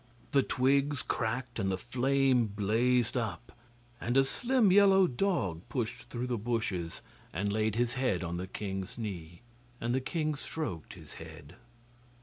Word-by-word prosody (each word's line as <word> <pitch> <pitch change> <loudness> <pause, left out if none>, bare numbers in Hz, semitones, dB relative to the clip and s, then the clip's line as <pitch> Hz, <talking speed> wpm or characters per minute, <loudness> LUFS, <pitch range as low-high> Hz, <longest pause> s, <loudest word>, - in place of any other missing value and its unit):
The 140 -3 +5
twigs 140 +2 +2
cracked 120 +1 -2
and 95 -2 +1
the 95 - 0
flame 130 +2 +2
blazed 110 +4 +1
up, 120 0 -3 0.5
and 120 +3 +1
a 135 - +6
slim 240 - +2
yellow 195 -1 +7
dog 120 - 0
pushed 120 -1 -3
through 120 0 -3
the 125 -3 -1
bushes 100 -7 -2 0.3
and 100 +4 -1
laid 110 -1 +1
his 120 +1 +1
head 125 -9 0
on 85 0 -3
the 90 +1 -4
king's 95 +3 -5
knee, 90 -6 -6 0.4
and 120 +1 -1
the 130 - +1
king 155 +2 -1
stroked 140 - -5
his - - -12
head. 70 +4 -11
120 Hz, 150 wpm, -31 LUFS, 100-135 Hz, 0.5 s, yellow